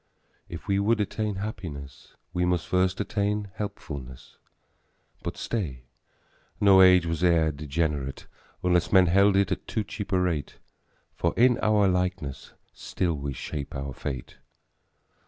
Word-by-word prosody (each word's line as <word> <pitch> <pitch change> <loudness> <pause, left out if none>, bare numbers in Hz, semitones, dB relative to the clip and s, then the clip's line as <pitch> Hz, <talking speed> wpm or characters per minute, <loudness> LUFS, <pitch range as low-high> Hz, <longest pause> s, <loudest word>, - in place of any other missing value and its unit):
If 85 - -8
we 100 0 +2
would 110 +3 +2
attain 105 0 -1
happiness, 85 -9 -7 0.2
We 90 - 0
must 90 -3 0
first 90 0 +1
attain 105 0 -1
helpfulness. 70 -11 -7 0.8
But - - -5
stay! 75 - -3 0.8
no 100 -2 +7
age 90 -2 +7
was 80 0 -2
e'er 85 -3 +4
degenerate 75 -1 -2 0.4
Unless 90 -1 +2
men 95 -2 +7
held 100 +3 +4
it 100 -2 +2
at 95 - -3
too 110 - -1
cheap 100 0 -7
a 95 - +3
rate, 85 -6 -1 0.6
For 85 - -1
in 125 0 +5
our 105 -2 +3
likeness 90 -6 -2 0.2
still 90 -3 -2
we 70 -2 -4
shape 70 +2 -6
our 70 0 -4
fate. 65 -2 -6
90 Hz, 135 wpm, -27 LUFS, 75-100 Hz, 0.8 s, no